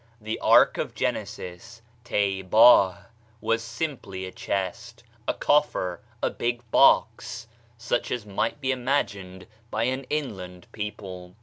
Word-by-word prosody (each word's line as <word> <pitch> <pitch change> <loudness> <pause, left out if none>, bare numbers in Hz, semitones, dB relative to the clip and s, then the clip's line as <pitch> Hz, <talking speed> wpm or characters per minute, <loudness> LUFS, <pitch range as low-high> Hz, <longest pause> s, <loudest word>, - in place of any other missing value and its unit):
The 110 0 -4
ark - - +5
of - - -3
Genesis 110 +6 -4 0.2
(têbâh) 100 0 +4 0.3
was 115 +1 0
simply 115 -6 -5
a 95 - -7
chest, 105 +7 -4 0.2
a - - +2
coffer, 145 - +1 0.2
a - - +2
big 120 0 -2
box, 115 0 +3 0.3
such 120 +1 -1
as 120 -4 -3
might 105 +6 -2
be 135 -2 0
imagined 105 -8 -2 0.2
by 110 0 -1
an 130 +2 -1
inland 95 - -4
people. 95 -4 -7
110 Hz, 120 wpm, -26 LUFS, 95-120 Hz, 0.3 s, ark